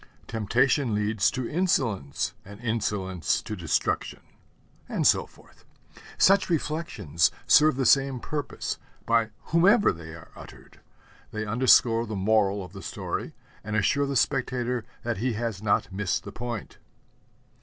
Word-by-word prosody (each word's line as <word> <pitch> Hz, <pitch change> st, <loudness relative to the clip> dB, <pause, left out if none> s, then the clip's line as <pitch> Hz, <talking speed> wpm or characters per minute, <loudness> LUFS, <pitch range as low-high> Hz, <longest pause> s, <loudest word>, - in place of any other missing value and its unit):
'Temptation 120 Hz, +3 st, +1 dB
leads 105 Hz, -1 st, +1 dB
to 130 Hz, -2 st, -4 dB
insolence, 120 Hz, -, -1 dB
and 100 Hz, +2 st, -12 dB
insolence 105 Hz, -6 st, -1 dB
to 105 Hz, -, -6 dB
destruction'; 85 Hz, -5 st, -2 dB, 0.7 s
and -, -, -1 dB
so -, -, +4 dB
forth. -, -, -22 dB, 0.5 s
Such 195 Hz, 0 st, +4 dB
reflections 155 Hz, -, 0 dB, 0.2 s
serve 155 Hz, -2 st, +5 dB
the 135 Hz, 0 st, -1 dB
same 135 Hz, -1 st, +3 dB
purpose, 145 Hz, +2 st, -4 dB, 0.3 s
by 115 Hz, -1 st, +2 dB, 0.2 s
whomever 190 Hz, +5 st, +5 dB
they 80 Hz, -1 st, -9 dB
are 85 Hz, -, -14 dB
uttered. -, -, -14 dB, 0.5 s
They 110 Hz, 0 st, -4 dB
underscore 115 Hz, 0 st, +4 dB
the 110 Hz, -, -4 dB
moral 100 Hz, -1 st, +1 dB
of 90 Hz, -, -15 dB
the 95 Hz, -, -9 dB
story -, -, -5 dB, 0.3 s
and 110 Hz, 0 st, -4 dB
assure 140 Hz, +7 st, +2 dB
the 140 Hz, -, -3 dB
spectator 125 Hz, -2 st, 0 dB, 0.2 s
that 120 Hz, -2 st, -2 dB
he 120 Hz, +4 st, -1 dB
has 110 Hz, -3 st, -3 dB
not 100 Hz, -3 st, 0 dB
missed 95 Hz, -1 st, -1 dB
the 100 Hz, -, -8 dB
point. 120 Hz, -1 st, -6 dB
115 Hz, 135 wpm, -26 LUFS, 100-130 Hz, 0.7 s, serve